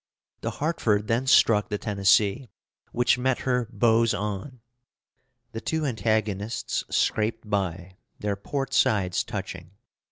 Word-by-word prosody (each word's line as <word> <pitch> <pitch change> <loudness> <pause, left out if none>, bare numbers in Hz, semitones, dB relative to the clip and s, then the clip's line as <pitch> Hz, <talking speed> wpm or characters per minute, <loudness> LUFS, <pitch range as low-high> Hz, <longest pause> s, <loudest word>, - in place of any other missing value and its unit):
The - - -3
Hartford 115 -10 0
then 115 +4 0
struck 105 -5 +4
the 105 - -1
Tennessee, 100 +3 +2 0.4
which 120 +1 +2
met 130 0 0
her 125 -3 0
bows 115 +1 +3
on. 105 +5 -5 0.9
The 115 -1 -6
two 160 +3 -1
antagonists 110 -2 -1
scraped 110 0 0
by, 95 -2 -3 0.2
their 105 -1 -2
port 135 +7 -4
sides 100 -8 +2
touching. 95 -3 -7
110 Hz, 120 wpm, -26 LUFS, 100-120 Hz, 0.9 s, struck